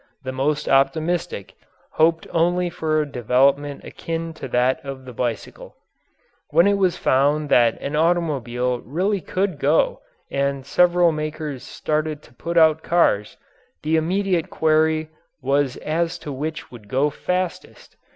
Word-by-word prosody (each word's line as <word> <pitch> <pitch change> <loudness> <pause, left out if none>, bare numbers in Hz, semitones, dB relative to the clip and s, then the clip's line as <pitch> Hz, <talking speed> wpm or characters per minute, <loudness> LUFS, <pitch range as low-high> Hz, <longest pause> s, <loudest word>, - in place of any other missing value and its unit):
The 130 - -4
most 145 +3 -1
optimistic 155 - 0 0.4
hoped 165 +1 +2
only 175 +1 +1
for 155 -1 0
a - - -7
development 140 +3 +1
akin 165 0 -5
to 160 - -7
that 125 +5 +1
of 135 -2 -7
the 125 - -9
bicycle. 120 -1 -4 0.7
When 170 - +4
it 200 0 +3
was 185 -3 +2
found 145 +3 +2
that 120 -4 +4
an 140 +2 -4
automobile 135 -7 0
really 185 - -1
could 185 -4 -2
go - - +2 0.3
and 140 -1 -1
several 175 +3 +4
makers 155 -3 -4
started 155 -1 -3
to 120 - -19
put 170 +7 -4
out 160 -1 +5
cars, 105 -13 +1 0.5
the 155 +1 +1
immediate 180 +1 0
query 155 0 +2 0.3
was 135 0 0
as 165 +2 -1
to 150 - -4
which 155 +2 -5
would 115 -4 -12
go 135 +7 +1
fastest. 180 +2 -4
155 Hz, 140 wpm, -22 LUFS, 135-170 Hz, 0.7 s, out